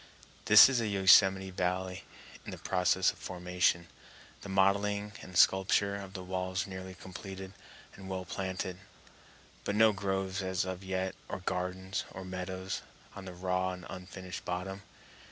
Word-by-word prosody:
This 110 0 +10
is 130 -3 +1
a 110 - -1
Yosemite 95 -1 +5
Valley 90 0 -2 0.4
in - - -7
process 90 0 +2
of - - -17
formation, 90 -1 0 0.6
the 100 - -8
modeling 100 +2 +2
and 90 0 -6
sculpture 100 +2 +4
of 100 -1 -7
the 95 -2 -6
walls 95 +1 -2
nearly 95 -1 -7
completed 95 +2 -8 0.4
and 95 -1 -10
well 95 -1 -3
planted, 95 -1 -4 0.8
but 100 - -1
no 110 0 +6
groves 95 0 -2
as 95 -1 -1 0.2
yet 95 0 -2 0.2
or 95 - -4
gardens 95 +1 -2
or 95 - -7
meadows 95 0 -4 0.3
on 95 - -8
the 90 - -7
raw 90 +1 -1
and 90 -1 -9
unfinished 95 0 -7
bottom. 95 +2 -4
95 Hz, 140 wpm, -31 LUFS, 90-95 Hz, 0.8 s, This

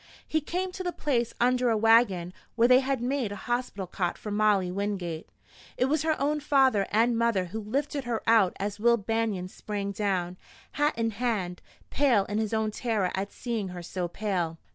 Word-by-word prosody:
He 315 - 0
came 365 +5 -3
to 375 +1 -7
the 360 -1 -2
place 245 -8 -1
under 250 0 +3
a 225 - +2
wagon 210 -6 +3 0.2
where 235 0 +4
they 255 +1 +7
had 270 -2 -1
made 255 -4 -1
a - - -4
hospital 240 -3 -3
cot 175 -1 -2
for 210 - -7
Molly 205 -3 +2
Wingate. 185 -4 -3 0.5
It 255 - +3
was 290 +3 +1
her 315 -1 0
own 295 +2 +1
father 265 -8 +3
and 230 +3 +3
mother 230 -5 +1
who 185 +5 -5
lifted 275 +5 -2
her 235 -2 -2
out 220 -5 +4
as 205 +1 -3
Will 235 +2 +4
Banion 220 -3 -1
sprang 200 +1 -4
down, 185 -3 -1 0.3
hat 295 -1 0
in 225 -1 0
hand, 200 -6 -2 0.3
pale 250 -8 +3
in 210 +1 -2
his 220 -2 -1
own 220 -1 0
terror 215 -5 -1
at 195 +1 -3
seeing 230 -5 -3
her 180 -1 -7
so 180 +1 -3
pale. 175 -4 -2
220 Hz, 190 wpm, -28 LUFS, 195-250 Hz, 0.5 s, they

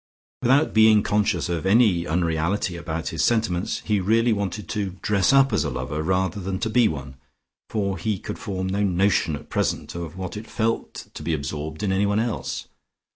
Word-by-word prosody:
Without 135 +4 +3
being 110 -1 +6
conscious 105 -1 +1
of 85 -3 -2
any 95 -4 +3
unreality 85 +3 0
about 85 -1 -4
his 80 - -1
sentiments, 110 -6 0
he 105 -2 +1
really 115 +5 +3
wanted 100 0 -3
to 100 -3 -3
dress 100 0 +3
up 135 0 +5
as - - +2
a - - -1
lover 65 +5 -3
rather 95 +3 0
than 95 +1 -3
to 110 +2 -2
be 120 -1 +5
one, 70 -6 -6 0.5
for 100 -3 -1
he 110 -3 -1
could - - -7
form 95 -2 -3
no 95 +2 -1
notion 95 -4 +2
at 75 - -11
present - - -1
of 85 0 -6
what 95 0 -5
it 105 +2 -7
felt 115 +1 -2
to - - -8
be 80 - 0
absorbed 75 +4 -5
in 100 - +1
anyone 100 +2 +2
else. 115 -1 -3
95 Hz, 185 wpm, -24 LUFS, 85-105 Hz, 0.5 s, being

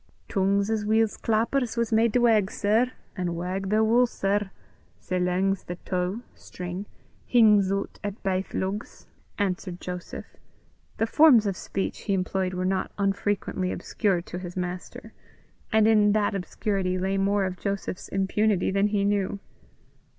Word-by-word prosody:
"Tongues 200 +2 +1
as 220 -1 0
weel 220 +2 +3
's 205 - -11
clappers 230 +2 0
was 235 -1 0
made 225 +1 +4
to 245 - +3
wag, 220 -5 +4
sir; 225 +5 +1 0.2
an, 180 -3 -2
wag 185 +3 -3
they 215 +1 +3
wull, 235 +3 +4
sir, 200 -2 -1 0.5
sae 185 -1 -2
lang 180 +2 +1
's 195 - -7
the 175 - -6
tow 185 +4 -2
(string) 180 +3 -7 0.4
hings 210 -5 +5
oot 195 0 -3
at 205 0 -5
baith 190 -1 -2
lugs," 195 +3 -4 0.3
answered 185 -2 -2
Joseph. 180 0 -6 0.7
The 225 - +2
forms 245 -2 +6
of 200 -2 -1
speech 195 - -4
he 200 - -1
employed 185 0 -1
were 180 0 -2
not 190 0 -1
unfrequently 195 -2 -1
obscure 190 -5 -1
to 180 - -7
his 180 0 -8
master, 180 0 -5 0.6
and 220 -1 +4
in 210 -2 +5
that 210 -1 +1
obscurity 195 -1 -2
lay 190 +1 0
more 200 0 +2
of 185 -1 -4
Joseph's 200 -2 -4
impunity 195 0 +1
than 200 +1 +2
he 205 -1 0
knew. 200 -1 0
195 Hz, 160 wpm, -26 LUFS, 185-215 Hz, 0.7 s, forms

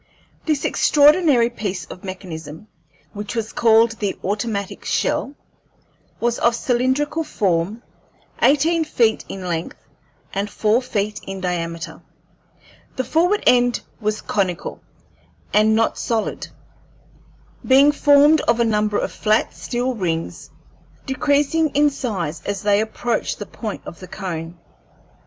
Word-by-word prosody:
This 305 -3 0
extraordinary 290 -5 +4
piece 200 -5 -4
of 180 - -11
mechanism, 175 -2 -8 0.5
which 205 +2 -6
was 225 -1 -3
called 225 0 +4
the 200 -2 -2
automatic 200 0 -3
shell, 280 - -1 0.8
was 240 0 0
of 235 0 +3
cylindrical 260 +6 0
form, 195 - -1 0.6
eighteen 320 +4 +3
feet 230 -7 +1
in 190 -1 -6
length 165 -1 -3 0.6
and 200 +1 -2
four 215 +4 +1
feet 210 -4 -2
in 195 0 -5
diameter. 170 -2 -4 0.9
The 260 - -1
forward 350 - +1
end 245 -1 +4 0.2
was 215 -1 -2
conical 185 -4 -2 0.7
and 215 +1 +4
not 225 0 +1
solid, 225 -2 -2 1.2
being 275 +3 +6
formed 290 +1 +5
of 235 0 +3
a 235 - +3
number 210 -1 +1
of - - -2
flat 215 0 +1
steel 250 +1 -2
rings, 165 - -3 0.6
decreasing 290 +3 +1
in 295 0 +4
size 180 - -4
as 200 0 -3
they 205 0 +3
approached 225 +2 -2
the 205 - -6
point 215 +1 -6
of 170 - -9
the 185 - -10
cone. 175 -4 -6
220 Hz, 125 wpm, -21 LUFS, 195-260 Hz, 1.2 s, being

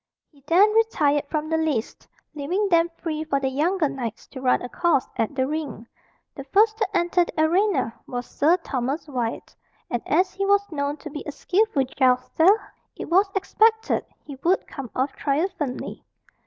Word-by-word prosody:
He 280 -3 -24
then 400 +6 +5
retired 295 -11 +2
from 305 -1 -2
the 320 0 +1
lists, 295 -9 -2 0.3
leaving 350 +8 -1
them 335 -1 +4
free 310 -2 -3
for 285 -3 0
the 265 -1 -1
younger 320 +4 +1
knights 240 -5 -5
to 260 - -9
run 255 -1 +2
a - - -4
course 335 0 +1
at 225 +5 -1
the 260 -1 +1
ring. 290 -6 -4 0.5
The 275 - -8
first 425 +9 +3
to 425 -3 0
enter 350 +1 +2
the 340 - -7
arena 330 - +2
was 245 -1 -4
Sir 325 +5 +2
Thomas 275 -1 -3
Wyat; 245 -5 -4 0.4
and 240 -2 -1
as 365 +5 +2
he 390 +1 -3
was 405 0 +3
known 285 -1 -2
to 305 - -9
be 295 - -6
a - - -3
skilful 370 -2 +1
jouster, 255 +6 +2 0.5
it - - -7
was 390 +3 +4
expected 440 +3 +2 0.2
he 280 -2 -9
would 370 +3 +2
come 270 -4 -8
off 265 +2 0
triumphantly. 290 -2 -2
310 Hz, 175 wpm, -24 LUFS, 270-370 Hz, 0.5 s, then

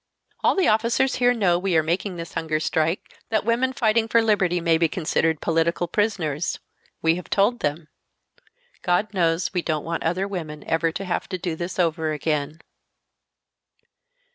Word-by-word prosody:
"All - - +4
the 385 - +2
officers 230 +4 +2
here 245 -1 +4
know 190 -8 +2
we 185 -2 +1
are 160 - +3
making 180 +4 -1
this 170 -1 -7
hunger 155 -1 -1
strike 160 +2 -1 0.2
that 215 -2 0
women 240 +3 +2
fighting 225 -2 +1
for 230 - +4
liberty 200 -6 +2
may 165 -1 +2
be 165 - +4
considered 160 -1 0
political 170 +1 +1
prisoners; 170 -6 -1 0.5
we 165 +1 +3
have 180 - -9
told 210 +5 +2
them. 150 +2 -2 0.9
God 185 +4 0
knows 170 -1 +1
we 180 - 0
don't 155 -3 -2
want 165 0 -3
other 180 +4 0
women 155 -6 -6
ever 165 0 0
to 195 +4 -5
have 180 - -2
to 185 - -3
do 175 -2 -3
this 175 +2 -5
over 160 -3 0
again." 150 0 -2
175 Hz, 165 wpm, -23 LUFS, 160-205 Hz, 0.9 s, All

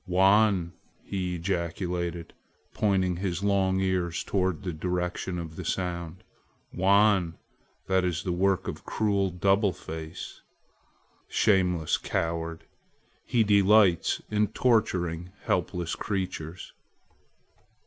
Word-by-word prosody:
"Wan!" 95 -1 +3 0.3
he 90 -2 -3
ejaculated, 85 -1 -3 0.4
pointing 95 -4 +1
his 90 0 -2
long 95 -2 +2
ears 90 -3 0
toward 95 -5 -1
the 90 -3 -3
direction 90 +2 -2
of 80 -2 -7
the - - -5
sound; 85 -1 -3 0.5
"Wan! 95 -3 +3 0.5
that 95 -1 +2
is 85 -3 -1
the 90 - -2
work 95 +2 +1
of - - -5
cruel 100 -3 0
Double 95 +3 +2
Face. 80 -2 -8 0.9
Shameless 90 -5 +2
coward! 80 0 -2 0.6
he 120 -2 +2
delights 100 -3 +4
in 105 0 +2
torturing 90 -8 0
helpless 85 -2 -1
creatures!" 95 -4 -4
90 Hz, 100 wpm, -27 LUFS, 85-100 Hz, 0.9 s, delights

